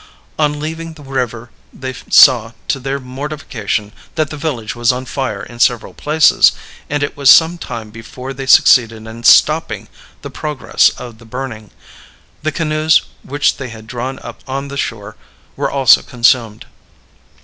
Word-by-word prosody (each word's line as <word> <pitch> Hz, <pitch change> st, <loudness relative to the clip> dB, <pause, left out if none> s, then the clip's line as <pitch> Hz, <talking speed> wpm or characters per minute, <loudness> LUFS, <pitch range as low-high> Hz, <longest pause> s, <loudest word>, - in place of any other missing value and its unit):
On 150 Hz, -1 st, +1 dB
leaving 160 Hz, +2 st, -6 dB
the 155 Hz, -2 st, -15 dB
river, 125 Hz, -3 st, -4 dB, 0.2 s
they 130 Hz, 0 st, -7 dB, 0.2 s
saw, 115 Hz, -4 st, +6 dB, 0.2 s
to 135 Hz, -, 0 dB
their 135 Hz, +1 st, -3 dB
mortification, 125 Hz, -6 st, -5 dB, 0.2 s
that 155 Hz, -3 st, -1 dB
the -, -, -5 dB
village 135 Hz, -8 st, -4 dB
was 120 Hz, 0 st, +2 dB
on 125 Hz, +1 st, -5 dB
fire 125 Hz, -7 st, -4 dB
in 120 Hz, 0 st, -11 dB
several 120 Hz, -1 st, +1 dB
places, 150 Hz, 0 st, +4 dB, 0.4 s
and 145 Hz, 0 st, -1 dB
it 145 Hz, -, -3 dB
was 140 Hz, -2 st, +3 dB
some 165 Hz, +4 st, +6 dB
time 110 Hz, -7 st, -7 dB
before 125 Hz, +4 st, -9 dB
they 135 Hz, 0 st, -7 dB
succeeded 115 Hz, -3 st, +5 dB
in 115 Hz, +1 st, -10 dB
stopping -, -, +3 dB, 0.4 s
the -, -, -7 dB
progress 150 Hz, -3 st, +1 dB
of 120 Hz, -3 st, -10 dB
the 115 Hz, -, -16 dB
burning; 115 Hz, -3 st, -7 dB, 0.7 s
the 155 Hz, -, -1 dB
canoes 155 Hz, 0 st, +2 dB, 0.2 s
which 145 Hz, +1 st, 0 dB
they 130 Hz, -2 st, -6 dB
had 110 Hz, -1 st, -11 dB
drawn 125 Hz, +3 st, -5 dB
up -, -, -9 dB
on 135 Hz, +1 st, -4 dB
the 140 Hz, -, -7 dB
shore 105 Hz, -6 st, -5 dB, 0.4 s
were -, -, -2 dB
also 135 Hz, -2 st, +5 dB
consumed. 120 Hz, -3 st, 0 dB
130 Hz, 160 wpm, -16 LUFS, 115-145 Hz, 0.7 s, saw